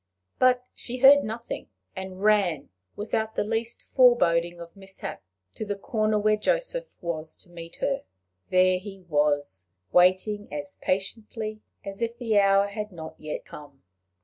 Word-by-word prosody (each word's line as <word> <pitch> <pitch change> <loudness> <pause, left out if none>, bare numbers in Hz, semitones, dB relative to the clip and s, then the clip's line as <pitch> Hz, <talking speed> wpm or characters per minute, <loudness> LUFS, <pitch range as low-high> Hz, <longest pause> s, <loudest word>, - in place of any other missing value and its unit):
But 250 -1 +4
she 250 +1 -6
heard 275 +2 +8
nothing, 230 +2 -5 0.3
and 190 0 -7
ran, 195 -9 +2 0.3
without 220 +1 -2
the - - +1
least 225 +2 -2
foreboding 175 -9 +3
of 170 +1 -10
mishap, 195 - -7 0.3
to - - -5
the 205 -1 -3
corner 215 0 0
where 215 0 +3
Joseph - - -1
was 160 -2 -4
to 175 - -16
meet 170 -1 -9
her. 275 0 0 0.5
There 185 0 +4
he 195 0 -10
was, 145 - 0 0.2
waiting 185 +4 +3
as 150 +6 -5
patiently 215 +3 -3 0.2
as 195 +2 -7
if 230 0 -2
the 225 -4 +2
hour 195 0 +5
had 210 +1 -5
not 160 -3 -8
yet 155 -1 -5
come. 145 -2 -13
200 Hz, 150 wpm, -26 LUFS, 175-225 Hz, 0.5 s, heard